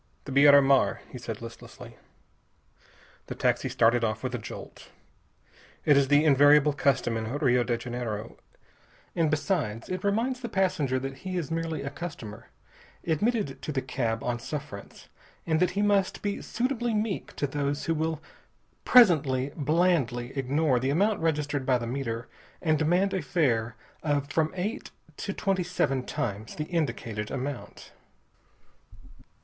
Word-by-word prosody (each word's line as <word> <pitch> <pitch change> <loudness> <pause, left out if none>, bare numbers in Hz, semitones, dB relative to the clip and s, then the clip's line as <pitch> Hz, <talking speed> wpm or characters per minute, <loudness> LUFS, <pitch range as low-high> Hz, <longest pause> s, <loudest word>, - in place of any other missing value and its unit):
"The 140 - -7
Beira 140 +1 +7
Mar," 135 -1 +3
he 125 - -8
said 115 -2 -6
listlessly. 115 +1 -11 1.3
The - - -5
taxi - - 0
started 115 +1 +3
off 110 0 -1
with 130 -1 -3
a 125 - -2
jolt. - - -10 1.0
It 145 - +6
is 140 -1 +4
the 145 +3 +4
invariable 145 +1 +6
custom 140 -6 +1
in 110 0 -2
Rio 125 -3 +2
de 120 -1 -1
Janeiro. 120 -3 -5 0.8
And 165 -3 +2
besides, 150 - -1
it 185 0 -3
reminds 230 +6 0
the 240 -2 -5
passenger 185 -10 +1
that 135 +1 -5
he 185 +1 -5
is 165 -3 -3
merely 165 -1 -2
a 140 - -4
customer, 130 -9 -8 0.6
admitted 175 - 0
to - - -4
the 135 - 0
cab 120 -3 -2
on 120 -1 -2
suffrance, 140 -4 -8 0.4
and 160 -1 +1
that 180 0 +3
he 205 - +2
must 200 -2 +1
be 205 -1 -2
suitably 240 -2 -1
meek 210 -1 -2
to - - -1
those 145 +1 -2
who 165 - +1
will 160 0 -1 0.6
presently 145 - +5
blandly 145 -6 +1
ignore 135 0 +1
the 130 +2 -1
amount 200 +9 +2
registered 145 -3 -1
by 130 -1 +2
the 120 - -5
meter 120 -2 -4 0.3
and 155 -2 +1
demand 180 +5 +2
a 190 - 0
fare 120 -7 0 0.3
of 145 -2 -1
from 160 0 +1
eight 210 +10 -3 0.3
to - - -4
twenty 195 -2 0
seven 155 -7 0
times 110 -3 -4
the 150 - -3
indicated 115 -10 -2
amount. 135 0 -6
145 Hz, 150 wpm, -27 LUFS, 125-170 Hz, 1.3 s, Beira